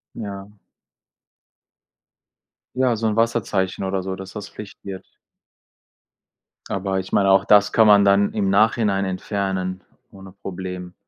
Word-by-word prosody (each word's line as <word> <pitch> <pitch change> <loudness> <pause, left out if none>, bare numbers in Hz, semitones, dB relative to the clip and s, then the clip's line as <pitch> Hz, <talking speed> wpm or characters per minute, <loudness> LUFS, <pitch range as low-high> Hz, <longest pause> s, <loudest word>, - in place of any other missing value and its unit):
Ja. 100 -2 -7 2.2
Ja, 130 -2 +2
so 110 +1 -3
'n 110 - 0
Wasserzeichen 105 -5 0
oder 95 0 -1
so, 95 +1 -4
dass 95 0 -10
das 105 -1 -7
Pflicht 105 -2 -11
wird. 95 -1 -8 1.6
Aber 95 0 -2
ich 95 - -7
meine, 100 -1 +3
auch 95 0 +5
das 105 -2 +4
kann 110 -1 +5
man 100 -1 +6
dann 100 +1 +3
im 100 -2 0
Nachhinein 105 -1 +2
entfernen, 95 -1 -3 0.3
ohne 95 -1 -13
Problem. 90 -2 -7
100 Hz, 130 wpm, -22 LUFS, 95-105 Hz, 2.2 s, man